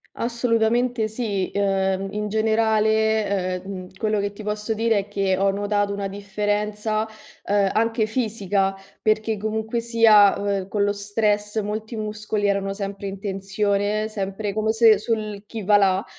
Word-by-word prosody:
Assolutamente 235 0 +1
sì. 215 -4 -2
Uhm, 195 -1 0
in 210 0 -3
generale, 220 -3 +1
uhm, 190 -1 -7
quello 215 0 0
che 200 0 -2
ti 215 - -10
posso 210 +1 -2
dire 225 0 +1
è 200 0 -2
che 195 -2 0
ho 195 +1 +2
notato 205 0 0
una 200 -1 -3
differenza, 210 +2 -2 0.4
uhm, 200 -1 +3
anche 225 0 +1
fisica, 205 -4 0 0.3
perché 215 0 +1
comunque 220 +2 -2
sia, 225 -3 +5
uhm, 200 -2 -2
con 200 +1 0
lo 205 - +2
stress 210 +1 0
molti 215 +3 -4
muscoli 210 -1 -3
erano 195 0 0
sempre 200 0 -5
in 195 0 -7
tensione, 200 +2 -1
sempre 200 0 -3
come 220 +1 0
se, 225 -2 +6
sul 215 -1 -3
chi 220 -1 -6
va 205 +2 +5
là. 195 -1 +2
210 Hz, 150 wpm, -23 LUFS, 200-220 Hz, 0.4 s, se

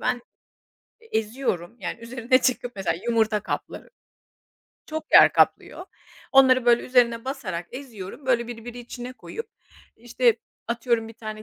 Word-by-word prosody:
Ben, 245 -1 -1 0.8
eee, 455 - -20
eziyorum 220 -4 -2
yani 210 +4 -5
üzerine 235 +1 +1
çıkıp 245 -2 0
mesela 190 -4 -1
yumurta 220 -2 +2
kapları, 205 - -6 1.0
çok 315 0 -6
yer - - +9
kaplıyor. 360 - +1 0.5
Onları 260 -2 +6
böyle 240 0 +4
üzerine 235 -2 +2
basarak 210 -11 -4
eziyorum, 250 -1 -9
böyle 235 -2 +2
birbiri 240 +1 -8
içine 245 +1 -8
koyup, 455 - -8 0.5
işte, 240 0 +2 0.3
atıyorum 235 -1 0
bir - - -10
tane 215 -1 -7
240 Hz, 130 wpm, -24 LUFS, 225-255 Hz, 1.0 s, yer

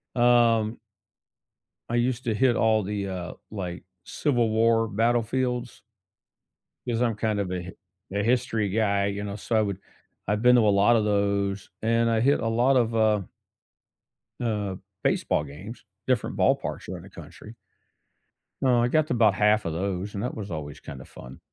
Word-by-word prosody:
Um 120 -2 +3 1.1
I 120 - -1
used 120 +1 0
to 115 - +1
hit 125 +1 +2
all 110 -2 +2
the, 100 0 -3
uh, 90 -2 -5 0.2
like, 90 -4 -5 0.2
civil 120 -6 0
war 115 +1 +3
battlefields 120 +3 -1 1.0
'cause 120 -1 -1
I'm 115 -3 +1
kind 105 -1 -1
of 95 -2 -2
a 90 -1 -3
hi 90 - -8 0.4
a 100 - +1
history 110 -3 +1
guy, 100 -1 +1
you 100 0 -3
know, 100 -1 -5
so 110 +2 -3
I 110 - +4
would 100 -3 -2 0.5
I've 105 +1 0
been 125 0 +7
to 120 - +5
a - - +5
lotta 105 +3 +4
those, 100 -2 0
and 115 +1 +2
I 110 - +2
hit 140 +5 +3
a 115 - -1
lot 120 +4 +2
of, 115 -1 +1
uh 110 -2 +3 1.2
uh, 105 -5 -2 0.3
baseball - - +1
games, 80 - -10 0.2
different 130 -4 0
ballparks - - 0
around - - -6
the - - -13
country. 110 +2 -12 1.1
Uh, 125 -2 +4
I 120 - +3
got 155 +4 +2
to - - -1
'bout 110 -4 +4
half 105 +2 +2
of 85 - -2
those, 95 +3 -3
and 100 - -4
that 125 - -3
was 105 -3 -6
always 75 -3 -6
kinda 65 -1 -10
fun. 65 +2 -12
110 Hz, 170 wpm, -26 LUFS, 100-120 Hz, 1.2 s, been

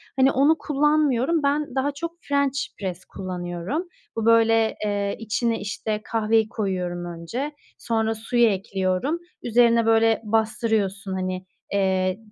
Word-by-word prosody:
Hani, 270 0 +4
onu 290 +5 +4
kullanmıyorum. 295 0 +2
Ben 285 -1 0
daha 270 +2 +1
çok 335 +4 -5
french 280 -1 0 0.2
press 185 -2 -5
kullanıyorum. 185 - -4 0.3
Bu, 225 - -2
böyle, 225 -1 +4
eee, 200 -1 -1
içine, 225 +1 -1
işte, 210 +1 -3
kahveyi 220 -1 +1
koyuyorum 180 -5 -2
önce, 175 - -5 0.2
sonra 225 -1 0
suyu 235 +2 +2
ekliyorum, 195 - 0 0.2
üzerine, 235 -1 +4
böyle, 225 0 +4
bastırıyorsun, 215 -3 0
hani, 185 0 -3 0.3
eee, 200 - +2
y 185 0 +1
225 Hz, 125 wpm, -24 LUFS, 195-265 Hz, 0.3 s, Hani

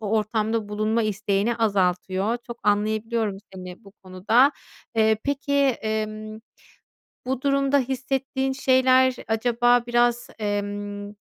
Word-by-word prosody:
o 210 -2 -4
ortamda 215 0 0
bulunma 215 +2 0
isteğini 210 +2 0
azaltıyor. 195 0 0
Çok 235 -1 -8
anlayabiliyorum 215 +1 0 0.2
seni 185 +3 -10
bu 195 - -15
konuda. 215 +9 +3 0.4
Eee, 220 -1 +3
peki, 280 0 -2
emm, 215 -5 -1 0.9
bu 260 0 -2
durumda 275 0 +2
hissettiğin 265 +1 -2
şeyler 260 -1 +3
acaba 240 +2 +2
biraz, 240 0 +1
emm, 205 0 -4
220 Hz, 105 wpm, -24 LUFS, 205-255 Hz, 0.9 s, konuda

